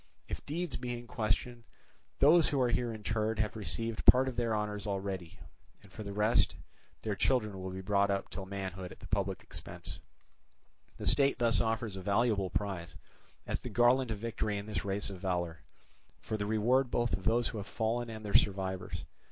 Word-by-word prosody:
If - - -5
deeds 165 +3 -2
be 120 -1 -3
in 120 - -9
question, 115 +1 -1 0.5
those 160 +4 +6
who 140 - +1
are 125 -2 +3
here 120 0 +1
interred 110 0 -1
have 110 0 0
received 115 +1 -2
part 130 +1 +8
of 130 - -3
their 115 -2 +1
honours 105 -1 -2
already, 95 -4 -3 0.5
and 100 - -17
for 110 - -8
the 100 -1 -5
rest, 105 +3 +3 0.5
their 105 -2 -1
children 105 -5 +1
will 95 - -4
be 95 +1 -5
brought 100 +1 +2
up 100 -1 -1
till 95 -1 -5
manhood 95 -2 -5
at - - -12
the - - -11
public 100 -2 -1
expense: - - -8 1.0
the - - -6
state 140 -1 +4
thus 115 -1 +4
offers 110 -2 -1
a - - -5
valuable 100 0 +2
prize, 95 -5 -3 0.5
as - - -2
the - - -6
garland 120 +1 +4
of 110 - -2
victory 110 -1 -2
in 100 - -5
this 105 0 -3
race 100 +1 -1
of 95 - -8
valour, 85 -3 -1 0.6
for 110 - -4
the 105 -1 -2
reward 120 +5 +3
both 120 -4 0
of 90 +2 -2
those 115 +2 +3
who 110 - -5
have 100 - -6
fallen 115 +3 -1
and 110 -1 -7
their 100 - -4
survivors. 95 -5 +1
105 Hz, 195 wpm, -32 LUFS, 100-120 Hz, 1.0 s, part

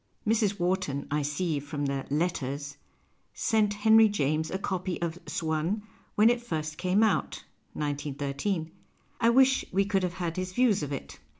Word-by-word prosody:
Mrs. 210 -3 +2
Wharton, 175 -6 -1
I 150 +1 +1
see 150 +2 -1
from 145 0 -4
the 140 -1 -2
" - - -22
Letters," 145 -2 -2 0.6
sent 215 -3 +1
Henry 220 +1 +6
James 155 -4 0
a 190 - -2
copy 185 -2 -3
of 170 0 -3
" - - -25
Swann 160 +6 -1 0.2
" - - -34
when 220 +3 +6
it 240 0 -1
first 155 -8 -4
came 185 +4 +3
out 220 - 0 0.3
(191.3): 145 +4 -2 0.5
I 230 - +4
wish 265 +2 +5
we 195 +2 +2
could 195 -1 +1
have 180 -1 -2
had 175 -2 -3
his 185 0 -3
views 235 -4 +3
of 145 -1 -4
it. 140 - -6
175 Hz, 175 wpm, -28 LUFS, 150-205 Hz, 0.6 s, Henry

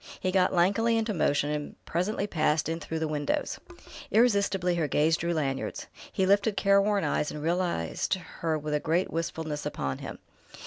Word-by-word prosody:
He 185 - -1
got 185 -1 +3
lankily 205 +6 +3
into 225 -1 0
motion 145 -4 +1
and 150 -1 -5
presently 195 +4 -1
passed 155 -5 +1
in 165 +1 -2
through 160 0 -4
the 160 0 -1
windows.... 150 -1 -2 0.5
Irresistibly 200 -5 +3
her 165 -3 0
gaze 155 +3 +3
drew 170 +2 -2
Lanyard's. 140 -5 -2 0.3
He 190 - +1
lifted 200 +1 +3
careworn 200 0 +3
eyes 150 - 0
and 150 - -6
realized 170 - 0
her 170 -3 -3
with 150 0 -4
a 150 - +2
great 165 +4 0
wistfulness 160 -2 -3
upon 70 - -3
him. - - -7
170 Hz, 170 wpm, -28 LUFS, 150-195 Hz, 0.5 s, got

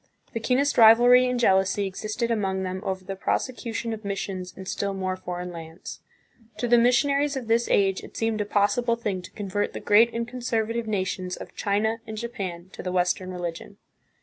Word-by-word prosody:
The 230 - -2
keenest 260 +4 +1
rivalry 245 +3 +7
and 250 -1 -1
jealousy 195 -2 +3
existed 215 +5 -3
among 190 -4 0
them 185 0 -4
over 190 -2 -3
the 195 - -4
prosecution 230 +2 -2
of 220 0 -7
missions 195 -2 -4
in 190 - -8
still 200 +1 -2
more 185 -1 -2
foreign 180 -1 -6
lands. 165 0 -9 0.6
To 240 - -1
the 240 0 +5
missionaries 280 +4 +3
of 260 -3 -4
this 230 +1 +2
age 195 -1 +2
it - - -11
seemed 225 -1 0
a - - -1
possible 205 +4 +2
thing 205 -5 -3
to - - -11
convert 205 0 -3
the - - -5
great 225 +3 +5
and 230 0 -3
conservative 235 -2 -2
nations 185 -3 -2
of - - -10
China 215 +3 0
and 220 -1 -6
Japan 190 -6 -5
to - - -7
the 180 - -3
Western 180 +1 0
religion. 175 +2 -6
205 Hz, 185 wpm, -25 LUFS, 190-235 Hz, 0.6 s, rivalry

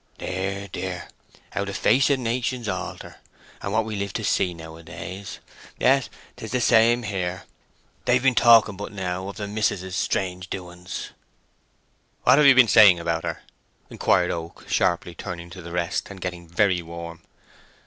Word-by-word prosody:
"Dear, 95 +2 -3
dear—how 95 +2 -7
the 100 0 -5
face 130 +6 +3
of 140 - +3
nations 125 -1 -2
alter, - - -5 0.4
and 100 - -4
what 110 +1 +1
we 110 -1 -4
live 100 -1 -3
to - - -3
see 90 - +1
nowadays! 85 +4 -9 0.4
Yes—and 135 0 +3 0.3
'tis 110 - -7
the 125 - +1
same 120 +1 +4
here. 90 -4 -3 0.6
They've - - +3
been 135 -1 +4
talking 115 -4 +6
but 100 +2 -7
now 95 -2 -4
of 100 - -7
the 105 -1 -4
mis'ess's 100 -3 -1
strange 90 -1 -2
doings." 90 -1 -7 1.1
"What 130 +3 +6
have 150 - +6
you 135 - +8
been 130 -2 +7
saying 100 -3 +7
about 85 -1 -1
her?" - - -4 0.5
inquired - - +2
Oak, 85 0 -7
sharply 85 0 0
turning 85 -2 -7
to 95 - -9
the 85 0 -9
rest, 85 -1 -2
and 100 -1 -9
getting 90 -1 -6
very 90 +1 +2
warm. 85 0 -8
95 Hz, 160 wpm, -24 LUFS, 90-110 Hz, 1.1 s, you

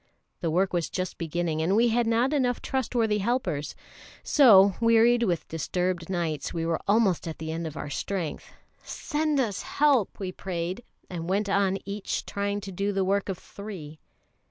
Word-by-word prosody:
The 165 - -1
work 185 +4 +1
was 170 -2 0
just 185 -1 -4
beginning, 165 -1 -1
and 180 +5 +2
we 235 +2 +4
had 235 0 +1
not 235 +5 +2
enough 250 -4 +1
trustworthy 230 -5 0
helpers; 200 - -1 0.5
so, 200 -9 +7
wearied 230 +1 +5
with 180 -8 0
disturbed 175 +2 -2
nights, 165 -5 -2
we 165 -1 -2
were 165 -1 0
almost 200 -5 +2
at 160 - -5
the 160 0 -5
end 165 0 -3
of 155 - -8
our 145 - -5
strength. 175 +2 -4 0.3
"Send 305 -2 -1
us 215 -7 -1
help!" 280 -8 +2
we 190 -2 -3
prayed, 185 +3 -4 0.2
and 170 -1 -5
went 200 +2 0
on 195 -1 +2
each 200 +1 -3
trying 200 0 -2
to 195 -1 -7
do 200 +3 -1
the 195 -1 0
work 200 +1 0
of 190 - -2
three. 180 -7 -9
195 Hz, 175 wpm, -27 LUFS, 170-225 Hz, 0.5 s, so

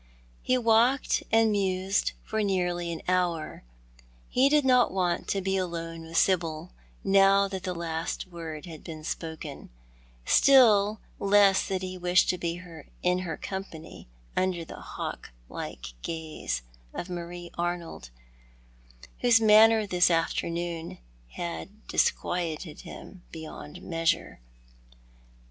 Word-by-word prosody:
Ho 255 0 +3
walked 235 +3 +3
and 225 -1 +4
mused 195 -1 0
for 220 0 -2
nearly 180 -3 0
an 165 - -6
hour. 175 - -1 0.7
He 265 +2 +4
did 295 -1 +3
not 250 -3 +4
want 180 -2 -1
to 195 - 0
be 190 +1 0
alone 165 -2 -4
with 165 +1 -4
Sibyl 170 -2 +1 0.3
now 195 0 +5
that 190 -1 -5
the 180 -1 -4
last 165 -1 -3
word 165 -4 -7
bad 160 -3 -10
been 155 -2 -8
spoken; 160 -2 -6 0.6
still 215 -6 +5 0.2
less 200 -1 +4
did 190 -1 -2
he 185 0 -5
wish 180 0 +4
to 180 - -1
be 170 0 -3 0.4
in 180 0 +2
her 170 -4 -4
company 190 -5 -7 0.3
under 185 -3 0
the - - -10
hawk - - -6 0.2
like - - -7
gazo 155 - -4 0.3
of 175 - -4
Mario 175 -1 -7
Arnold, 170 - -4 1.1
whose 240 -2 +5
manner 220 0 +6
this 180 -3 +3
afternoon 170 0 -1 0.4
had 80 -7 -6
dis - - +4
quieted 165 -2 -4
him 185 - -11
beyond 160 +1 -9
measure. 165 -1 -1
180 Hz, 125 wpm, -28 LUFS, 165-195 Hz, 1.1 s, manner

